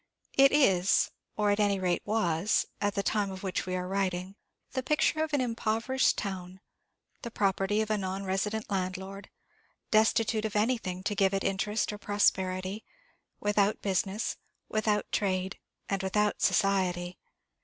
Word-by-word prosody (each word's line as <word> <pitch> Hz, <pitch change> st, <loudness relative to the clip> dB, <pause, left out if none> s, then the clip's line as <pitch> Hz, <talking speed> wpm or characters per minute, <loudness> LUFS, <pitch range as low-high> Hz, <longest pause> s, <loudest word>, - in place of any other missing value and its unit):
It 275 Hz, 0 st, +6 dB
is, 195 Hz, -11 st, +3 dB, 0.3 s
or, 210 Hz, -1 st, +2 dB
at 205 Hz, -, +1 dB
any 205 Hz, -1 st, +3 dB
rate, 180 Hz, -2 st, 0 dB
was, 200 Hz, -3 st, +1 dB, 0.2 s
at 205 Hz, -1 st, 0 dB
the 200 Hz, -, 0 dB
time 205 Hz, -1 st, 0 dB
of 190 Hz, 0 st, -8 dB
which 190 Hz, -1 st, -2 dB
we 185 Hz, -, -1 dB
are 180 Hz, 0 st, -3 dB
writing, 190 Hz, -1 st, -1 dB, 0.4 s
the 260 Hz, -, -1 dB
picture 305 Hz, +3 st, +1 dB
of 315 Hz, -, -3 dB
an 290 Hz, -2 st, +2 dB
impoverished 230 Hz, +2 st, +1 dB
town 185 Hz, -2 st, -5 dB, 0.6 s
the 235 Hz, -, -5 dB
property 200 Hz, 0 st, +1 dB
of 220 Hz, 0 st, -2 dB
a 215 Hz, -, +1 dB
non 190 Hz, +1 st, -3 dB
resident 210 Hz, +3 st, -2 dB
landlord 190 Hz, +1 st, -4 dB, 0.6 s
destitute 220 Hz, 0 st, +3 dB
of 215 Hz, -1 st, -3 dB
anything 210 Hz, -5 st, 0 dB
to 205 Hz, -, -1 dB
give 195 Hz, -1 st, +2 dB
it 195 Hz, -, -1 dB
interest 210 Hz, +3 st, 0 dB
or 205 Hz, -, -8 dB
prosperity 190 Hz, -1 st, 0 dB, 0.6 s
without 205 Hz, 0 st, +1 dB
business, 195 Hz, +2 st, -1 dB, 0.3 s
without 215 Hz, -1 st, +1 dB
trade, 190 Hz, -1 st, -1 dB, 0.3 s
and 195 Hz, -1 st, -1 dB
without 210 Hz, +2 st, 0 dB
society. 185 Hz, -2 st, +1 dB
200 Hz, 150 wpm, -29 LUFS, 190-215 Hz, 0.6 s, It